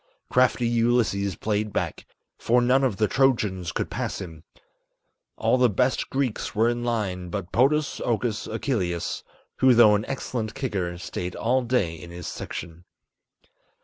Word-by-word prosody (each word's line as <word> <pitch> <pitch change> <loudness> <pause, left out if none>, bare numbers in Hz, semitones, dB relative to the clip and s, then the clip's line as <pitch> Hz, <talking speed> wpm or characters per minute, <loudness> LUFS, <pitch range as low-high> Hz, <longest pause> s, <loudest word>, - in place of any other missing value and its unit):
Crafty 125 -1 +3
Ulysses 115 -4 +1
played 105 0 -1
back, - - -3 0.3
for 120 +2 +3
none 125 +3 +3
of 120 -7 +1
the 105 - +2
Trojans 105 -10 +1
could - - -3
pass - - -3
him, 80 -3 -9 0.9
All 130 - +2
the 125 -1 +5
best 125 +6 0
Greeks 135 -4 -2
were 110 +2 +3
in 120 0 -2
line, 100 -7 -2
but 95 -1 -5
Podas 145 +4 +2
Okus 115 -2 -1
Achilleus, 100 - -2 0.4
Who 130 -2 +5
though 115 -3 +7
an 105 +1 +1
excellent 120 -4 -4
kicker 95 -10 -2
stayed 90 +1 -5
all 130 +3 +1
day 120 -9 0
in 85 +1 -10
his 85 0 -8
section. 85 +1 -7
110 Hz, 145 wpm, -25 LUFS, 95-125 Hz, 0.9 s, though